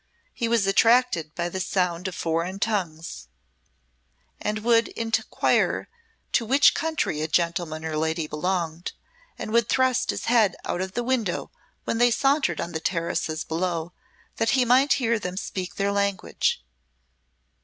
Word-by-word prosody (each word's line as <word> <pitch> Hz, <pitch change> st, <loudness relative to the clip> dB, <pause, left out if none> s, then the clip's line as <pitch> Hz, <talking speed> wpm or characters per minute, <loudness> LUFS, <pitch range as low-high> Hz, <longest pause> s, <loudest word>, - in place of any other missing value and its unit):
He 235 Hz, -, -2 dB
was 230 Hz, -3 st, +2 dB
attracted 195 Hz, -6 st, +3 dB
by 170 Hz, 0 st, -1 dB
the 185 Hz, +2 st, -4 dB
sound 180 Hz, -1 st, -1 dB
of 185 Hz, -, -5 dB
foreign 170 Hz, +3 st, -1 dB
tongues, 165 Hz, -, -3 dB, 1.1 s
and 210 Hz, 0 st, -2 dB
would 230 Hz, 0 st, +4 dB
inquire 225 Hz, 0 st, 0 dB, 0.4 s
to 240 Hz, -, +2 dB
which 270 Hz, +5 st, +5 dB
country 315 Hz, -, -1 dB
a 155 Hz, -, -1 dB
gentleman 170 Hz, -1 st, -1 dB
or 160 Hz, -1 st, -3 dB
lady 160 Hz, +1 st, 0 dB
belonged, 165 Hz, +1 st, -2 dB, 0.4 s
and -, -, -5 dB
would 235 Hz, -1 st, +2 dB
thrust 255 Hz, -1 st, +2 dB
his -, -, -2 dB
head 230 Hz, -5 st, +3 dB
out 175 Hz, -, -2 dB
of 190 Hz, 0 st, -4 dB
the 240 Hz, -, -1 dB
window 235 Hz, -7 st, -1 dB, 0.3 s
when 230 Hz, -, -2 dB
they 245 Hz, 0 st, +6 dB
sauntered 275 Hz, +5 st, +2 dB
on 170 Hz, -, -3 dB
the 160 Hz, -, -3 dB
terraces 165 Hz, -2 st, -2 dB
below 170 Hz, 0 st, -2 dB, 0.4 s
that 225 Hz, -, +1 dB
he 250 Hz, -, +3 dB
might 260 Hz, +4 st, +5 dB
hear 235 Hz, -4 st, +1 dB
them 180 Hz, -2 st, -5 dB
speak 185 Hz, -3 st, -4 dB
their 200 Hz, 0 st, 0 dB
language. 200 Hz, -, 0 dB
190 Hz, 150 wpm, -25 LUFS, 170-230 Hz, 1.1 s, they